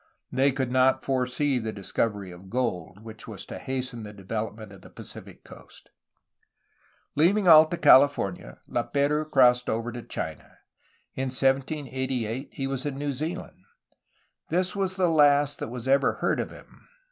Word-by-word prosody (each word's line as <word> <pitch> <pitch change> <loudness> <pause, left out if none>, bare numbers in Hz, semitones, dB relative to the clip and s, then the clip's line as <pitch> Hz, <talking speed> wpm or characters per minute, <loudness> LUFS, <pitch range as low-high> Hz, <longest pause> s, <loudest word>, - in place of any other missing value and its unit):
They 135 +2 +3
could 130 -2 -2
not 130 +1 +3
foresee 130 +1 0
the 110 -1 -4
discovery 100 -1 -2
of 90 +2 -13
gold, 100 -6 -3
which 110 -1 -10
was - - -7
to - - -8
hasten 130 -2 -4
the 105 -1 -8
development 105 +1 -5
of 95 - -14
the - - -14
Pacific - - -10
coast. - - -15 1.2
Leaving 185 +6 +3
Alta 160 +1 +7
Califor 130 - +5
nia, - - -13
Laperouse 150 +2 0
crossed 125 -3 +4
over 115 +2 -2
to 120 0 -7
China. - - -7 0.6
In 130 0 -3
1788 130 -2 -1
he 135 - -4
was 135 -1 -3
in 135 -2 -4
New 145 0 -2
Zealand. 155 - -6 0.9
This 180 +4 0
was 190 -2 -1
the 185 -2 +2
last 145 -2 +4
that - - -4
was 125 +1 -7
ever 135 0 +3
heard - - -1
of - - -2
him. - - -16
130 Hz, 155 wpm, -26 LUFS, 115-145 Hz, 1.2 s, Alta